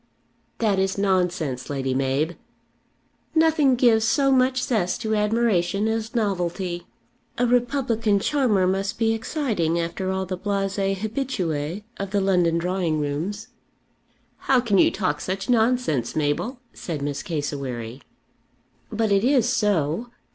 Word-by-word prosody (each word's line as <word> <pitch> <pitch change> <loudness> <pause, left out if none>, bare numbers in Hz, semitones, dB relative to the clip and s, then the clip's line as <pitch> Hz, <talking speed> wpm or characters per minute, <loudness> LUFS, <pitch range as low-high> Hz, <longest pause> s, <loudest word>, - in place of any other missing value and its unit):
"That 210 -4 +1
is 190 0 0
nonsense, 180 -9 0
Lady 135 -2 -1
Mab." 135 +5 0 1.0
"Nothing 315 -4 +4
gives 235 -3 +4
so 275 +4 +3
much 255 -1 +3
zest 205 -9 0
to 220 0 0
admiration 210 -3 +1
as 225 +1 -2
novelty. 180 -4 -2 0.5
A 245 - +2
republican 240 -3 +1
charmer 230 -7 +2
must 195 +2 -1
be 225 0 +2
exciting 220 - -1
after 170 +3 -3
all 190 0 -1
the 185 0 -5
blasées 195 0 -1
habituées 195 - -3
of 200 -1 -4
the 200 +1 +1
London 180 -4 +2
drawing 175 -2 -1
rooms." 160 +9 -3 0.9
"How 265 -2 +2
can 215 -6 +2
you - - +6
talk 185 -3 -2
such 195 +5 -2
nonsense, 225 - +1
Mabel?" 155 - -1
said 155 -5 -5
Miss 145 -1 -2
Cassewary. 135 -6 -4 0.9
"But 220 -1 0
it 200 0 +3
is 255 -2 +3
so. 205 - 0
195 Hz, 130 wpm, -24 LUFS, 170-230 Hz, 1.0 s, you